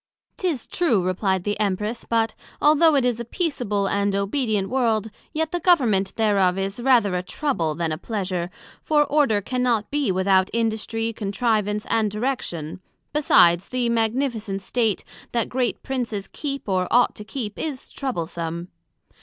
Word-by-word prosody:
'Tis 330 -10 -1
true, 245 - +1
replied 185 0 0
the 205 +1 -2
Empress: 210 +3 -1
but 225 -1 +1 0.3
although 305 +1 +5
it 270 -3 +3
is 245 -2 +1
a - - -2
peaceable 235 - -1
and 200 0 +1
obedient 205 -1 0
world, 225 -4 0 0.2
yet 320 0 -1
the 350 - -1
Government 235 - +3
thereof 200 -4 +2
is 195 +4 -3
rather 235 -7 +4
a 180 - 0
trouble, 180 - -2
then 165 0 -1
a 155 - -3
pleasure; 185 -5 -3 0.3
for 300 -1 +3
order 280 -10 +2
cannot 245 -2 0
be 285 -7 +1
without 190 0 +3
industry, 225 0 -1
contrivance, 210 0 0
and 220 -2 +2
direction: 210 - -3 0.3
besides, 180 - +5
the 250 -2 0
Magnificent 225 -3 -1
state, 225 0 0 0.3
that 235 -2 0
great 250 -1 -1
Princes 235 -7 -3
keep 275 -4 -5
or 185 -2 +1
ought 245 +1 +4
to 210 - -9
keep, 215 -1 -5
is 285 -5 -4
troublesome. 170 - -4
220 Hz, 150 wpm, -23 LUFS, 195-255 Hz, 0.3 s, although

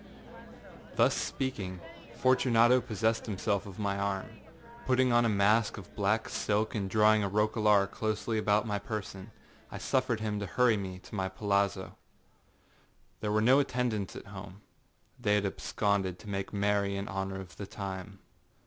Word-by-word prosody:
â - - -18
Thus - - +4
speaking, 100 -9 -3 0.4
Fortunato 125 -1 +4
possessed 110 0 -1
himself 100 -1 -1
of 95 - -10
my 100 -1 -1
arm. 100 +1 -2 0.6
Putting 130 -1 +3
on 120 0 +4
a - - +3
mask 105 +2 +3
of 100 - -11
black 105 +2 +1
silk, 105 +1 0
and 100 -3 -2
drawing 110 0 +4
a 100 - -1
roquelaire 105 0 +3
closely 110 +2 -2
about 105 0 +2
my 105 -2 -1
person, 100 -1 -6 0.4
I - - -6
suffered 125 -4 0
him 105 -1 -2
to 100 - -4
hurry 125 0 +3
me 95 -2 -5
to 95 - -15
my 95 -2 -1
palazzo. 100 0 -1 1.2
There 105 - -2
were 110 0 +2
no 130 +5 +6
attendants 125 -7 -1
at - - -8
home; 100 +1 -10 0.6
they 105 -4 +2
had 105 -1 +1
absconded 100 -2 -1
to 105 - -14
make 100 -1 -3
merry 100 -1 +1
in 100 +1 -4
honor 95 0 -3
of 95 -2 -11
the 100 - -6
time. 100 0 -6
105 Hz, 160 wpm, -30 LUFS, 100-110 Hz, 1.2 s, no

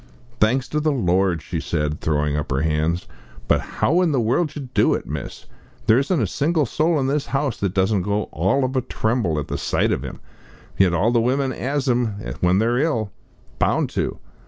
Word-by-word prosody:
"Thanks 125 +4 +2
to 150 - 0
the 155 0 +1
Lord!" 95 - +1
she - - -4
said, 75 0 -2
throwing 75 -1 0
up 75 0 -3
her 65 +1 +1
hands. 80 +2 0 0.4
"But - - +3
how 170 +6 +1
in 175 -3 +2
the 135 - +1
world 120 +9 +2
did - - -16
you 140 -4 -6
do - - +3
't, - - -17
miss? - - -6 0.4
There 110 +3 +5
isn't 150 +4 0
a 115 - +2
single 150 - +1
soul 155 +2 +1
in 135 - 0
this 140 +2 0
house 135 -3 -1
that 100 -1 -2
doesn't 95 +1 +2
go 105 +3 0
all 95 - +1
of 130 +1 -3
a 130 - +2
tremble 110 -8 -1
at 75 - -3
the - - -3
sight - - +1
of - - -1
'im. - - -7 0.6
Yet 90 -3 +3
all 110 +7 +2
the 120 -1 +3
women 130 +3 +1
has 135 +3 -2
'im 125 -1 +2 0.3
when 90 +1 +3
they're 115 +4 +2
ill 115 -10 0 0.5
bound - - +1
to. - - -2
115 Hz, 210 wpm, -22 LUFS, 90-140 Hz, 0.6 s, There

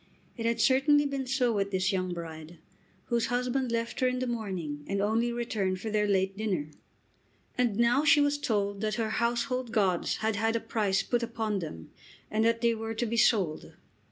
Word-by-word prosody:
It 230 -1 -2
had 230 0 0
certainly 275 +5 +4
been 275 -2 -3
so 250 -2 +1
with 200 -1 0
this 190 -1 0
young 185 -1 -1
bride, 165 -1 -7 0.5
whose 235 -1 0
husband 250 +1 -1
left 230 0 -2
her 255 - +3
in 250 0 0
the 255 - -1
morning 185 -11 -4
and 200 0 -1
only 225 +4 +1
returned 215 -6 -2
for 220 +3 -4
their 210 0 +1
late 195 -1 +1
dinner. 185 -8 -2 0.8
And 245 -4 +1
now 240 +4 +3
she 295 0 +6
was 290 0 +2
told 205 -5 -1
that 215 -1 -1
her 225 -2 -1
household 240 +2 -1
gods 190 -5 +1
had 220 -1 -1
had 225 +2 +1
a - - +2
price 210 -4 0
put 240 -1 0
upon 225 -3 -2
them 80 - -8 0.4
and 220 +1 +1
that 230 0 +2
they 235 -1 +3
were 225 0 -4
to 240 - -1
be 230 +1 -2
sold. 195 -8 +1
225 Hz, 195 wpm, -29 LUFS, 195-240 Hz, 0.8 s, she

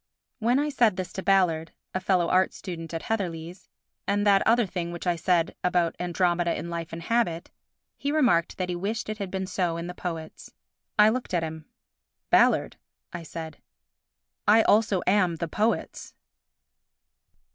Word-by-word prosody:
When 240 +3 +2
I 295 +1 +1
said 235 -8 +3
this 185 -1 -5
to 190 - -4
Ballard 175 -5 +2 0.2
[a 185 - 0
fellow 185 -2 +2
art 185 +2 +2
student 165 -4 -7
at 165 -1 -4
Heatherley's] 180 -5 -4 0.4
and 205 +1 +1
that 200 -1 +5
other 235 +1 +4
thing 175 -2 -4
which 175 +1 -7
I 175 -1 +2
said 170 0 +1
about 175 -2 +1
Andromeda 175 -1 0
in 170 - -6
Life 170 -1 -5
and 165 0 -7
Habit, 175 -6 0 0.5
he 280 - -1
remarked 245 - +2
that 185 -1 -2
he 175 - -1
wished 210 +5 -3
it 215 0 -4
had 200 -2 -3
been 190 0 -3
so 180 -3 -1
in 170 - -4
the 180 - -6
poets. 165 -3 -7 0.4
I 210 +1 +7
looked 240 -5 -2
at 170 - +1
him. 160 -1 -6 0.7
"Ballard," - - +4 0.4
I 175 - -5
said, 160 -1 -8 0.9
"I 220 +2 +6
also 210 -3 +3
am 185 -3 +3
'the 165 0 -4
poets. 215 +5 -2
180 Hz, 170 wpm, -26 LUFS, 170-205 Hz, 0.9 s, I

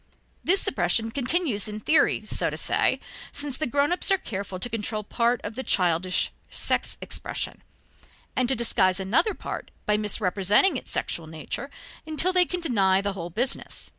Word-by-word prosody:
This 380 +3 +6
suppression 220 +3 +1
continues 260 - +2
in 210 0 -5
theory, 305 +9 +3
so - - -1
to - - -6
say, - - +1 0.3
since 285 -2 -2
the 310 +2 -1
grown 285 +5 +1
ups 355 - +1
are 390 - +5
careful 200 - -6
to 185 - -3
control 215 -2 -3
part 235 +3 +1
of 205 - -5
the 260 - -4
childish 180 -4 +1 0.2
sex - - -2
expressions, - - -4 0.7
and 255 -2 +1
to 265 - +4
disguise 200 -5 +2
another 225 - +2
part - - -6 0.2
by 210 0 +2
misrepresenting 210 - +2
its - - -6
sexual 165 -2 -3
nature 160 - -5 0.4
until 320 +4 +1
they 365 -1 +7
can 360 +1 -4
deny 195 - +3
the 200 0 -2
whole 175 -3 -6
business. 240 +9 -2
225 Hz, 165 wpm, -25 LUFS, 195-280 Hz, 0.7 s, they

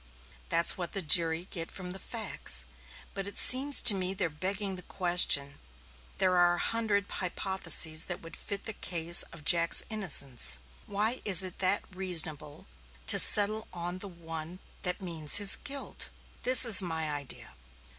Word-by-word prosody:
That's 170 +2 +4
what 175 - -6
the 195 - -4
jury 165 +2 +2
get 165 -2 -5
from 180 -2 -9
the 190 - -8
facts, 195 - -4 0.5
but 195 0 -7
it 200 - -7
seems 270 +3 +4
to 220 - +12
me 190 0 +1
they're 185 -5 -3
begging 190 +5 -3
the 180 - -8
question. 175 -7 +1 0.6
There 185 -1 0
are 175 0 +2
a - - -8
hundred 215 -1 -3
hypotheses 180 -4 -1
that 180 - -6
would 165 - -11
fit 200 -1 -5
the 220 - -4
case 170 -3 -1
of 160 -3 -14
Jack's 170 0 +4
innocence 140 - 0 0.3
why 215 +5 -2
is 190 -3 +3
it 185 -2 -4 0.4
reasonable 160 -5 -4 0.4
to - - +4
settle 215 +1 +4
on 175 0 -6
the 200 - -7
one 165 -1 -8 0.2
that 180 0 -2
means 160 -4 -1
his 205 -1 +3
guilt? 280 -1 -4 0.3
This 255 0 +6
is 210 -4 +7
my 160 -4 -4
idea. 140 - -8
180 Hz, 155 wpm, -28 LUFS, 165-200 Hz, 0.6 s, to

